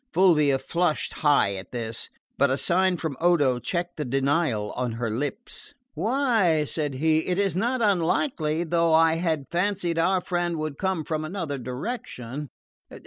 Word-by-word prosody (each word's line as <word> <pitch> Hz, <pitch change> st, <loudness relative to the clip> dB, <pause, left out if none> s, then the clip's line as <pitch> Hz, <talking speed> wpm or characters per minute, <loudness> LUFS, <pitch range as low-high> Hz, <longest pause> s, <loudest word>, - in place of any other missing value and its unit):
Fulvia 150 Hz, -7 st, +4 dB
flushed 170 Hz, +4 st, -1 dB
high 145 Hz, -9 st, +3 dB
at 95 Hz, 0 st, -7 dB
this, 115 Hz, -2 st, -4 dB, 0.3 s
but 140 Hz, 0 st, +3 dB
a 135 Hz, -, +1 dB
sign 185 Hz, +2 st, +2 dB
from 160 Hz, -4 st, -4 dB
Odo 145 Hz, -8 st, +3 dB
checked 175 Hz, +5 st, -3 dB
the 150 Hz, -, -2 dB
denial 135 Hz, -4 st, 0 dB
on 125 Hz, -2 st, -3 dB
her 115 Hz, -1 st, -3 dB
lips. 145 Hz, -, -5 dB, 0.2 s
"Why," 220 Hz, -, +2 dB
said 150 Hz, -2 st, -2 dB
he, 160 Hz, +3 st, +1 dB
"it 180 Hz, -, 0 dB
is 195 Hz, -4 st, +1 dB
not 235 Hz, +5 st, 0 dB
unlikely, 170 Hz, -, +1 dB
though 170 Hz, -1 st, +2 dB
I 165 Hz, 0 st, +4 dB
had 160 Hz, -4 st, -1 dB
fancied 175 Hz, -1 st, 0 dB
our 185 Hz, +3 st, +3 dB
friend 175 Hz, -2 st, -2 dB
would 155 Hz, -2 st, -4 dB
come 190 Hz, -4 st, -1 dB
from 155 Hz, 0 st, -3 dB
another 155 Hz, -4 st, -4 dB
direction. 130 Hz, -, -5 dB
160 Hz, 155 wpm, -25 LUFS, 140-180 Hz, 0.3 s, Fulvia